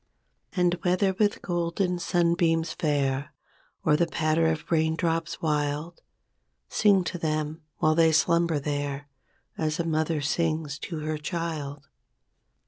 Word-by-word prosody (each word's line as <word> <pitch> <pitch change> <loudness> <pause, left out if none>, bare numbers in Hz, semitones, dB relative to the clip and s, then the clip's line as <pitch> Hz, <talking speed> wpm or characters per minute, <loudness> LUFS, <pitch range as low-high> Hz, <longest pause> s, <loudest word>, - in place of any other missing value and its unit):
And 180 -1 +2
whether 190 +1 +2
with 205 +1 0
golden 175 +1 -1
sunbeams 170 -2 +1
fair, 140 -4 -1 0.5
Or 150 - +5
the 170 +2 +2
patter 160 0 +1
of 160 0 -2
raindrops 165 +1 0
wild. 150 +2 -1 0.7
Sing 200 -3 +4
to 175 0 -4
them 155 0 -2 0.2
while 155 - +3
they 165 0 +4
slumber 170 +1 +3
there. 145 0 -3 0.5
As 155 +1 -1
a 170 - 0
mother 160 -1 0
sings 155 0 -1
to 175 -9 -5
her 155 0 -2
child. 150 -4 -4
160 Hz, 125 wpm, -27 LUFS, 150-170 Hz, 0.7 s, Or